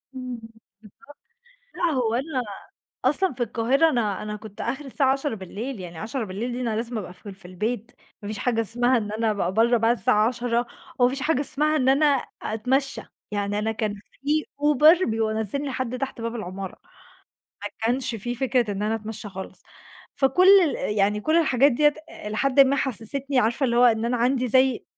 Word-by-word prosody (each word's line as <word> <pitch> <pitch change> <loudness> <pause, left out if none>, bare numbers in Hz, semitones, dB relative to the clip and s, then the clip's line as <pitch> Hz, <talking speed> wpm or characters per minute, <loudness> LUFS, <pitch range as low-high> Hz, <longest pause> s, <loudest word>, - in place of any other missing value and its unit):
إمم. 255 -2 -6
بالضبط 225 0 -14 1.2
لأ، 345 -2 +1
هو 240 -4 0
أنا 265 +1 -1 0.6
أصلًا 300 +5 +2
في 245 - -1
القاهرة 255 +7 +2
أنا 215 -8 -1
أنا 210 0 -4
كنت 210 -1 -9
آخري 275 +1 -3
الساعة 265 0 +2
22:00 235 - -5
يعني 175 -2 -8
22:00 220 +1 -4
دي 245 +1 -4
أنا 230 -3 -1
لازم 230 +1 -3
أبقى 185 -3 -6
في 195 +3 -12
ال 195 - -9
في 195 - -18
البيت، 215 +6 -4 0.3
ما 205 - -7
فيش 215 0 -4
حاجة 230 0 +1
اسمها 245 +3 +1
إن 210 -2 -3
أنا 220 0 0
أبقى 190 -3 -1
برّا 235 +3 +4
بعد 230 +1 +2
الساعة 210 +3 +3
22:00 240 0 -1 0.3
وما 245 0 +5
فيش 270 +1 -4
حاجة 295 -3 +1
اسمها 300 +2 0
إن 260 -3 +2
أنا 280 +3 +4 0.4
أتمشّى، 265 +6 -1 0.3
يعني 205 0 -1
أنا 220 +1 -1
كان 215 -1 -2
في 290 +9 -3 0.2
Uber 300 +5 +5
بينزلني 220 +4 -1
لحَد 255 -2 -3
تحت 270 -3 -5
باب 230 +1 -3
العمارة. 190 -2 -6 0.9
ما 205 - -3
كانش 240 +1 0
في 240 +3 -4
فكرة 245 -3 0
إن 195 - -4
أنا 215 +1 0
أتمشى 215 -1 -6
خالص. 190 -1 -9 0.5
فكل 275 +8 +3 0.2
ال 215 -8 -2
يعني 205 +1 +2
كل 315 +9 +2
الحاجات 280 -4 +4
ديّة 295 +3 +3 0.3
الي 210 +1 -4
حدٍ 275 +3 +3
ما 275 +1 +5
حسستني 270 +2 -2
عارفة؟ 240 +3 +1
اللي 235 -2 +1
هو 245 - +6
إن 225 -2 +3
أنا 240 +1 0
عندي 250 +1 +1
زي 260 0 +3
240 Hz, 185 wpm, -24 LUFS, 215-270 Hz, 1.2 s, هو